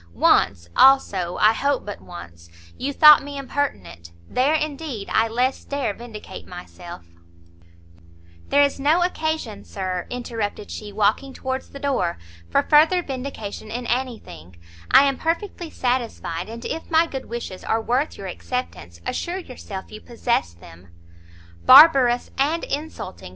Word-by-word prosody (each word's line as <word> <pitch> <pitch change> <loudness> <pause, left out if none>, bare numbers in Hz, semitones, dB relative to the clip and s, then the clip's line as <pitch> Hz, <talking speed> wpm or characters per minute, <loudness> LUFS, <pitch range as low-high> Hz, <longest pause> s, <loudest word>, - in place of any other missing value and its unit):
Once, 85 -3 +3
also 195 -10 +4
I 215 +1 +5
hope 280 +3 -1
but 205 - -7
once, 85 - -12 0.3
you 275 +2 -3
thought 300 +1 +8
me 285 0 -7
impertinent, 90 - -4 0.2
there, 275 +5 +1
indeed, 295 -7 -4
I 225 - +3
less 250 +4 -1
dare 280 -7 -2
vindicate 230 -1 -10
myself 175 - -10 0.7
" 85 0 -26
"There 285 +1 +5
is 280 0 0
no 310 +6 +3
occasion, 315 - -3
Sir," 185 -2 -4
interrupted 230 -4 -5
she, 210 -1 -7
walking 215 +6 0
towards 260 0 -4
the - - -10
door, 270 -12 -1 0.3
"for - - +2
further 320 +4 +4
vindication 250 -7 -6
in 240 +2 -5
any 245 0 -1
thing; 85 - -14 0.3
I - - +7
am 275 -2 +1
perfectly 340 +1 -3
satisfied, 230 - -3
and 230 +1 -8
if 325 - -5
my 325 0 +4
good 270 -5 -6
wishes 230 -5 -6
are 225 - 0
worth 250 +6 -1
your 195 - -8
acceptance, 175 - -6
assure 350 +2 -3
yourself 240 - -9
you 215 0 -10
possess 235 - -1
them." 85 +2 -15 0.8
"Barbarous, 260 - +7
and 310 +5 +1
insulting!" 300 +3 -6
240 Hz, 145 wpm, -22 LUFS, 185-280 Hz, 0.8 s, thought